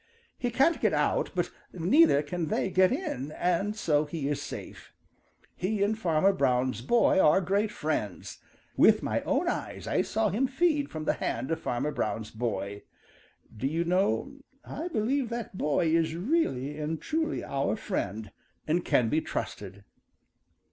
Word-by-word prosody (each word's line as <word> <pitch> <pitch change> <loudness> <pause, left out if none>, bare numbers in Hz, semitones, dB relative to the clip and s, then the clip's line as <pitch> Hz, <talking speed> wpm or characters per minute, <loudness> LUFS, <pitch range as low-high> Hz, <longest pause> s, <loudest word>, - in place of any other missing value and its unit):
He 245 - -2
can't 270 +8 +2
get - - +2
out, - - +1
but - - -1 0.2
neither 180 - +4
can 165 +2 -3
they 190 - -1
get 185 0 +4
in, 155 - -3
and 180 +5 0
so 155 -7 +1
he 150 -2 -4
is 145 - -2
safe. - - -8 0.6
He 200 +2 -1
and 210 +2 +1
Farmer 190 -2 +2
Brown's 125 -7 +1
boy 210 - +3
are 155 +1 +5
great 200 +4 +1
friends. 150 - -3 0.4
With - - +5
my - - 0
own - - +1
eyes - - -3
I - - +1
saw 220 -1 0
him 240 +8 +1
feed 290 +1 +1
from 155 -1 -6
the - - +2
hand 125 +7 -3
of 165 - 0
Farmer 130 +5 -1
Brown's 105 -3 -3
boy. 105 -3 -3 0.7
Do 125 +5 -2
you 165 +4 0
know, 195 +10 0 0.3
I 320 +5 -5
believe 255 -2 0
that 235 -4 -5
boy 160 0 +1
is 160 -1 +1
really 165 - -1
and 155 +1 -2
truly 320 0 -2
our 140 +5 -1
friend 110 - -4 0.3
and 170 +3 +1
can 120 - +2
be 155 +7 +1
trusted." 100 -7 -5
170 Hz, 160 wpm, -28 LUFS, 140-220 Hz, 0.7 s, are